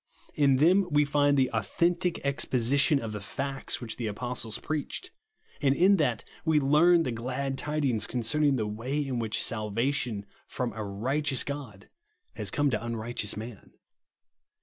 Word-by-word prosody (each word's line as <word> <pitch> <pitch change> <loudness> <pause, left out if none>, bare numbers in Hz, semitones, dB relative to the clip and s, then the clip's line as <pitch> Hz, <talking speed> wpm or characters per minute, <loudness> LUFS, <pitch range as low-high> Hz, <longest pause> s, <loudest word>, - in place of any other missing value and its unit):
In 140 -3 +4
them 180 +7 +4
we 150 -1 +3
find 145 0 +2
the 130 -1 +2
authentic 170 - 0
exposition 140 +2 +2
of 115 -3 -5
the 105 -1 -5
fads 135 +7 -4
which 115 -3 -6
the 115 - -3
apostles 115 +1 -3
preached; 155 - -4 0.5
and 140 -2 +3
in 195 +5 +5
that 125 - 0 0.2
we 160 -2 +3
learn 160 +5 +5
the 125 - -2
glad 130 +4 -3
tidings 140 -6 -1
concerning 135 +4 +1
the 110 -4 -1
way 115 +7 -3
in 130 -3 -2
which 110 -2 -1
salvation 115 0 -1 0.2
from 125 -2 -3
a 110 - -5
righteous 130 +8 0
God 130 -9 -7 0.5
has - - -3
come 145 -1 +1
to 110 -1 -1
unrighteous 115 -2 -3
man. 110 -1 -9
135 Hz, 150 wpm, -28 LUFS, 115-145 Hz, 0.5 s, in